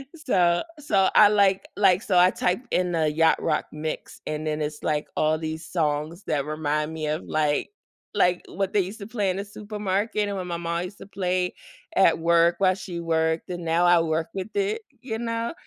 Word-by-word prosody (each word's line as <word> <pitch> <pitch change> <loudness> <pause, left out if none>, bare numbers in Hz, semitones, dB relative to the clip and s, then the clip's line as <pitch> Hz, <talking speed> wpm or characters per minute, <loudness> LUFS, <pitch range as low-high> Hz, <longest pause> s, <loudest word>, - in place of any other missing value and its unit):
So 180 - +2 0.2
so 195 -10 +2
I 210 - +8
like 200 -2 +3
like, 195 -2 +4
so 190 -5 +1
I 180 +1 +6
typed 210 +8 -2
in 180 -1 +1
the 160 -2 +1
yacht 160 +1 +3
rock - - 0
mix, 155 +1 -5
and 155 0 -3
then 155 0 -1
it's 150 0 -5
like 150 -1 -1
all 155 +1 +2
these 160 0 -5
songs 160 +2 -2
that 150 -6 -1
remind 150 0 -1
me 160 -1 -4
of, 155 +2 -2
like 150 -2 0 0.5
like, 180 0 +2
what 195 +1 -3
they 210 - +4
used 195 +4 -3
to 200 - -7
play 210 -5 0
in 185 - -4
the 200 - -4
supermarket 205 0 -2
and 200 - -3
when 185 - -4
my 170 -1 -3
ma 170 0 -2
used 180 +3 -6
to - - -9
play 180 -2 -1 0.4
at 190 -4 +5
work 170 +1 +4
while 185 -1 +4
she 180 -3 -6
worked, 160 0 0
and 175 -1 -5
now 165 +2 +2
I 175 -1 +6
work 160 0 -1
with 190 +2 -5
it. 410 +3 0 0.2
You 225 -4 -4
know? 230 +1 -2
175 Hz, 205 wpm, -25 LUFS, 160-200 Hz, 0.5 s, I